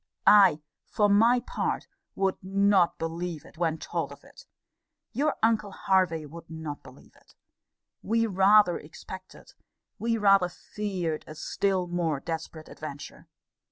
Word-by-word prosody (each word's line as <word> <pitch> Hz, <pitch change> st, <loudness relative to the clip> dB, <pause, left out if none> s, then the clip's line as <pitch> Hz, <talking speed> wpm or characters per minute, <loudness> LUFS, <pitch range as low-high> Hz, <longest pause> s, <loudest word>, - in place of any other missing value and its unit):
I, 195 Hz, -7 st, +6 dB, 0.3 s
for 210 Hz, -2 st, +2 dB
my 230 Hz, +5 st, +5 dB
part, -, -, -3 dB, 0.3 s
would 190 Hz, -1 st, -1 dB
not 195 Hz, -1 st, +3 dB
believe 165 Hz, -1 st, -4 dB
it, 160 Hz, -, -17 dB
when 165 Hz, -2 st, 0 dB
told -, -, -4 dB
of -, -, -13 dB
it. -, -, -16 dB, 0.6 s
Your 300 Hz, +2 st, 0 dB
uncle 220 Hz, -3 st, +2 dB
Hervey 185 Hz, -5 st, +1 dB
would 165 Hz, +3 st, -12 dB
not 160 Hz, -2 st, -6 dB
believe 130 Hz, +1 st, -17 dB
it. -, -, -24 dB, 0.7 s
We 230 Hz, +2 st, +1 dB
rather 195 Hz, -2 st, +4 dB
expected, 185 Hz, +4 st, -12 dB, 0.5 s
we 230 Hz, 0 st, 0 dB
rather 195 Hz, -4 st, +4 dB
feared, 180 Hz, -4 st, -4 dB
a 155 Hz, -, -9 dB
still 190 Hz, +3 st, -1 dB
more 170 Hz, -4 st, -1 dB
desperate 160 Hz, 0 st, -6 dB
adventure. 145 Hz, -2 st, -9 dB
185 Hz, 130 wpm, -27 LUFS, 160-205 Hz, 0.7 s, I